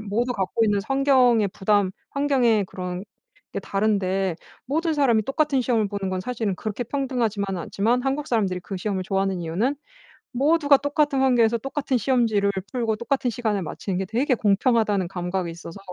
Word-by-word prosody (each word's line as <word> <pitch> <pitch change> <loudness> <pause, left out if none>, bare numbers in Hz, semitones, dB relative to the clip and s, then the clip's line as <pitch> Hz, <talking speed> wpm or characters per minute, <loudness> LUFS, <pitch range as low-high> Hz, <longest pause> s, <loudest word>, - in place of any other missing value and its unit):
모두 225 +4 -1
갖고 210 +2 0
있는 205 -1 +2
성경의 255 -3 +3
부담 200 0 +1 0.2
환경에 255 -7 +2
그런 180 +1 -5 0.5
게 - - -3
다른데 195 -3 0 0.3
모든 320 +4 0
사람이 245 -7 +3
똑같은 280 -1 +1
시험을 230 -4 +1
보는 200 -2 -3
건 185 -1 -2
사실은 225 -3 -2
그렇게 215 +3 -4
평등하지만은 225 -8 -2
않지만 235 +9 0
한국 275 +2 -1
사람들이 195 -6 0
그 195 +1 -6
시험을 190 -1 -2
좋아하는 195 -1 -1
이유는 200 - -1 0.6
모두가 285 +2 +4
똑같은 285 -1 +1
환경에서 235 -3 +3
똑같은 270 0 -2
시험지를 225 -5 +2 0.2
풀고 230 -4 0
똑같은 250 +1 -1
시간에 220 -4 -1
마치는 180 +3 -4
게 190 - -2
되게 250 +6 +1
공평하다는 210 -2 +2
감각이 180 -1 -3
있어서 170 +2 -9
220 Hz, 405 characters per minute, -24 LUFS, 195-260 Hz, 0.6 s, 모두가